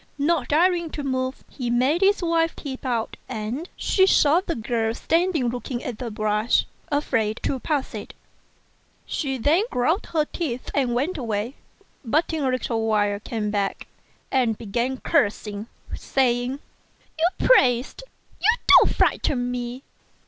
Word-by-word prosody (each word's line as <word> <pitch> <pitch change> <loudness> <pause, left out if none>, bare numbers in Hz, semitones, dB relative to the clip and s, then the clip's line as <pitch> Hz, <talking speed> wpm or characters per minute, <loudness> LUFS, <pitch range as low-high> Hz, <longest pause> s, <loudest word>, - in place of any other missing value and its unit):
Not 290 -2 +1
daring 340 +2 +2
to 290 - -4
move, 260 -1 -2
he 250 -3 -5
made 260 +8 +2
his 395 -1 +3
wife 330 -1 +1
peep 265 -2 -6
out; 230 -3 -2
and 245 +8 -4
she 380 -1 +3
saw 315 -1 +4
the 345 -3 -3
girl 225 0 -1
standing 330 -6 +1
looking 245 0 -4
at 240 -4 -5
the 245 - -4
brush, 215 +1 +1 0.3
afraid 230 -7 0
to 265 - -1
pass 285 +1 -2
it. - - -7 0.9
She 270 -4 -2
then 295 - +3
ground 315 - 0
her 310 -2 +1
teeth 270 -7 -4
and 255 -4 +1
went 300 +7 -1
away; 225 0 -2 0.5
but 305 +7 +1
in 315 -2 -1
a 265 - +2
little 230 -3 -1
while 205 -2 +1
came 210 -1 -3
back, 200 -2 -2 0.5
and 240 -5 +2
began 235 +5 -2
cursing, 210 -1 0 0.3
saying, 250 0 0 0.6
"You 345 +3 +1
priest, 255 - +4 0.4
you 445 +4 +4 0.2
won't - - +2
frighten 245 -3 +1
me. 245 +1 -5
255 Hz, 145 wpm, -24 LUFS, 230-310 Hz, 0.9 s, saw